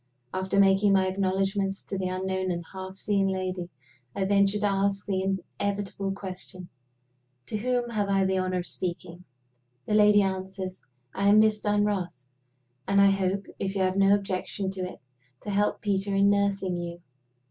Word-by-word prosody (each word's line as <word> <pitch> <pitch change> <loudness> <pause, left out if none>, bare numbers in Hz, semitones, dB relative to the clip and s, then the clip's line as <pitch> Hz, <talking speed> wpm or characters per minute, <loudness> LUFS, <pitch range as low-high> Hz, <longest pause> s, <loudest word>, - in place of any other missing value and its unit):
After 190 +1 0
making 195 +1 +5
my 190 -1 +4
acknowledgments 195 +1 -1
to - - -5
the 190 -1 -1
unknown 185 0 -2
and 170 -1 -3
half 190 0 -7
seen 195 0 +1
lady, 185 -2 -3 0.5
I 195 - 0
venture 200 +1 +3
to 210 - -1
ask 195 0 0
the 190 -2 -1 0.4
inevitable 200 -1 -2
question, 185 -2 -7 0.8
"To 215 - -3
whom 245 +1 -1
have 205 -3 -1
I 195 -1 +3
the 190 0 +1
honor 185 0 -1
of 175 - -3
speaking?" 175 0 -5 0.6
The - - -2
lady 210 -1 +6
answers, 190 0 -4 0.3
"I 200 +1 0
am 210 - +6
Miss 215 -1 +3
Dunross; 205 -9 0 0.6
and 200 0 +3
I 200 0 +7
hope, 195 0 0
if 195 +1 -2
you 195 - 0
have 185 0 +1
no 195 0 +5
objection 195 0 -3
to 190 -1 -6
it, 180 0 -5 0.4
to 205 - -5
help 205 +1 +1
Peter 200 -1 0
in 200 +1 +5
nursing 200 -2 0
you." 175 0 -5
195 Hz, 170 wpm, -27 LUFS, 185-200 Hz, 0.8 s, I